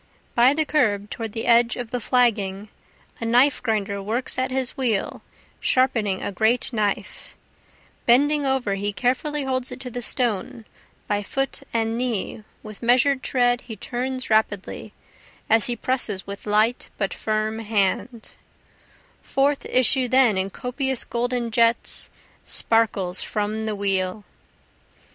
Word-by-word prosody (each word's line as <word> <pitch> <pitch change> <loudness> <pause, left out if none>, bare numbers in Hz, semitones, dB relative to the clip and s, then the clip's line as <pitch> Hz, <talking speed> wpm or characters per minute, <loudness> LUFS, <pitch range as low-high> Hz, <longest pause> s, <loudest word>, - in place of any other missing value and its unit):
By 245 +4 +5
the 315 0 +1
curb 210 -10 +1
toward 225 -2 -5
the 225 - -3
edge 235 0 +4
of 245 -2 -6
the 245 - -1
flagging, 210 -5 +1 0.5
A - - -5
knife 250 +5 +4
grinder 205 -4 -1
works 235 +6 -1
at 260 - 0
his 260 -1 -1
wheel 240 -8 -1 0.4
sharpening 225 -7 +1
a - - -2
great 220 +6 +1
knife, 210 -3 -3 0.7
Bending 290 +5 +4
over 265 -6 0
he 200 +1 -2
carefully 270 +6 -1
holds 260 -1 -2
it - - -7
to 250 -2 -7
the 245 +1 -4
stone, 240 -1 -2 0.4
by 205 0 0
foot 270 +6 -3
and 225 0 -1
knee, 230 -3 -2 0.2
With 215 -1 -10
measur'd 260 +3 +3
tread 245 -2 +1
he 235 -3 -8
turns 255 +2 -4
rapidly, 215 -3 0 0.5
as 225 -1 +4
he 240 - -1
presses 235 -7 -2
with 200 +1 -8
light 215 +4 +2
but 195 - -1
firm 215 0 -2
hand, 220 +2 -1 0.9
Forth 275 +1 0
issue 255 0 +3
then 255 -4 +4
in 190 +1 -1
copious 255 +4 -2
golden 240 0 -2
jets, 230 0 +2 0.3
Sparkles 205 -5 +1
from 215 +1 -2
the 215 - -1
wheel. 195 0 -1
235 Hz, 140 wpm, -23 LUFS, 210-255 Hz, 0.9 s, By